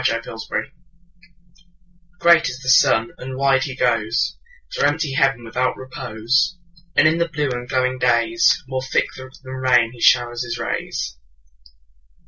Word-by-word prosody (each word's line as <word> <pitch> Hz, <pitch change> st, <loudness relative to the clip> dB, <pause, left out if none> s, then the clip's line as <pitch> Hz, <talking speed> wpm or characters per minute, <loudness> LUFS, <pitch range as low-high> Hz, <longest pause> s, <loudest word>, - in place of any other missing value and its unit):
Summer 115 Hz, -3 st, 0 dB
Sun 110 Hz, -1 st, -5 dB, 1.5 s
GREAT 170 Hz, -2 st, +4 dB
is 125 Hz, -, -7 dB
the 130 Hz, -, -3 dB
sun, 115 Hz, -3 st, +4 dB
and 130 Hz, +1 st, -7 dB
wide 135 Hz, -1 st, +2 dB
he 130 Hz, -2 st, -7 dB
goesThrough 120 Hz, -, -2 dB
empty 145 Hz, 0 st, +1 dB
heaven 135 Hz, -4 st, +1 dB
without 125 Hz, +3 st, -1 dB
repose; 130 Hz, +7 st, -1 dB, 0.4 s
And -, -, +5 dB
in 160 Hz, +2 st, +1 dB
the 170 Hz, -, +1 dB
blue 150 Hz, -3 st, -2 dB
and 125 Hz, 0 st, -5 dB
glowing 130 Hz, -1 st, 0 dB
daysMore 130 Hz, -, +1 dB
thick -, -, +2 dB
than 130 Hz, 0 st, -11 dB
rain 125 Hz, -3 st, +2 dB
he 120 Hz, -1 st, -14 dB
showers 120 Hz, -1 st, +3 dB
his 120 Hz, -, -5 dB
rays. -, -, -4 dB
130 Hz, 135 wpm, -20 LUFS, 120-140 Hz, 1.5 s, And